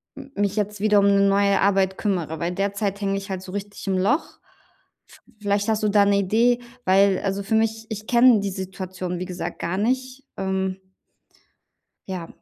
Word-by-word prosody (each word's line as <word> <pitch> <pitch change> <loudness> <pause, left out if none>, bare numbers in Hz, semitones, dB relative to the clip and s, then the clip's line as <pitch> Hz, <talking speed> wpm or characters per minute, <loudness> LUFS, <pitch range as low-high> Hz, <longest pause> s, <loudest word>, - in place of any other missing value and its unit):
m 275 -1 -11
mich 200 0 0
jetzt 210 0 -2
wieder 210 0 +4
um 200 - +4
'ne 200 0 +4
neue 200 0 +3
Arbeit 190 -1 +2
kümmere, 170 -6 -2
weil 170 +2 -1
derzeit 200 +1 -2
hänge 195 0 0
ich 195 0 -7
halt 185 - -3
so 185 - -10
richtig 205 +1 -7
im 190 - +1
Loch. 225 - 0 0.7
V - - -17 0.2
vielleicht 205 0 0
hast 215 -1 +1
du 210 - +3
da 205 0 +4
'ne 200 0 +3
Idee, 230 +5 +2 0.3
weil 195 0 +4
also 195 0 -1
für 220 +2 0
mich 225 0 0
ich 215 -1 -6
kenne 240 -2 +6
die 200 0 -2
Situation, 185 -1 -5
wie 180 - -3
gesagt, 175 -2 -5
gar 170 +3 -2
nicht, 255 +5 -2
ähm 190 -1 -2 1.3
Ja. 180 -3 -5
200 Hz, 190 wpm, -23 LUFS, 190-210 Hz, 1.3 s, kenne